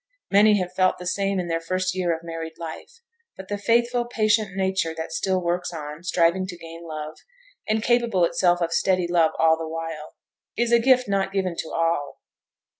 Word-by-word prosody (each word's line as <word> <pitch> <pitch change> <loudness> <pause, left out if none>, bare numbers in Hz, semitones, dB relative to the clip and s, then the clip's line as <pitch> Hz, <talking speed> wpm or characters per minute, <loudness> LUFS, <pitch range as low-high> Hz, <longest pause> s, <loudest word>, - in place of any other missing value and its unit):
Many 210 +1 +6
have 180 -2 -3
felt 185 0 +2
the 180 - -9
same 195 +1 0
in 175 - -3
their 165 0 -1
first 185 +2 -1
year 180 -2 0
of 165 0 -3
married 165 -1 -6
life; 165 - -9 0.4
but 190 0 -10
the 205 - -2
faithful, 240 +3 +2
patient 215 -4 +1
nature 190 -4 0
that 160 0 -5
still 185 +3 0
works 175 0 -2
on, 150 -1 -7
striving 180 +1 +1
to 180 -2 -7
gain 165 0 -10
love, 155 0 -6 0.5
and 215 0 0
capable 235 -7 +2
itself 175 0 +2
of 165 0 0
steady 185 -1 +2
love 170 -2 +3
all 160 0 +4
the 165 - -4
while, 160 -1 -6 0.4
is 235 +1 +1
a 235 - +6
gift 255 0 +4
not 195 -1 0
given 190 -3 -1
to - - -4
all. 165 -4 -1
180 Hz, 190 wpm, -24 LUFS, 165-200 Hz, 0.5 s, Many